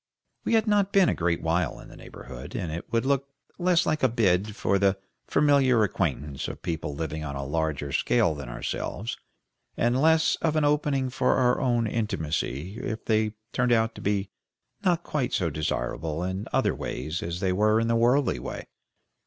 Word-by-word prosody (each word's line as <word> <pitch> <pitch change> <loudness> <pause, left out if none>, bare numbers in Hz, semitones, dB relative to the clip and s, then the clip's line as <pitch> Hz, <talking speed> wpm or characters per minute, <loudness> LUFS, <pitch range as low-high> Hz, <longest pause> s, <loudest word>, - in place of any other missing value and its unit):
We - - +2
had 220 -1 +3
not 205 -2 +2
been 195 -3 +5
a - - +2
great 85 0 -1
while 80 -1 0
in - - -12
the - - -13
neighborhood, - - -10
and 85 - -3
it 85 +6 -6
would 115 +1 +1
look 140 0 +1 0.3
less 175 -1 +3
like 155 0 0
a 130 - +4
bid 105 -3 +1
for 100 -3 +1
the 100 0 +3 0.3
familiar 135 -6 +4
acquaintance 75 -7 -2
of - - -8
people 80 -3 -3
living 80 0 -4
on 70 -2 -5
a 70 0 -4
larger 75 -1 -2
scale 100 - +2
than 70 -5 -7
ourselves, - - -4 0.6
and 120 +3 +2
less 160 +1 +4
of 160 -2 0
an 155 -1 +3
opening 145 -3 +1
for - - +2
our 125 -1 +3
own 120 -2 +2
intimacy 95 - -2
if 110 -2 -4
they 110 -1 +1 0.2
turned 125 -1 +1
out 115 -1 +2
to - - -10
be 100 -1 -1 0.5
not 175 -2 +2
quite 135 -5 -2
so 85 -4 +1
desirable 75 +2 -2
in 95 +2 -3
other - - +2
ways 80 +3 -4
as 85 +1 -4
they 95 -1 +1
were 110 +3 +3
in 115 - 0
the 115 - +2
worldly 120 - +3
way. - - -6
105 Hz, 185 wpm, -26 LUFS, 80-130 Hz, 0.6 s, been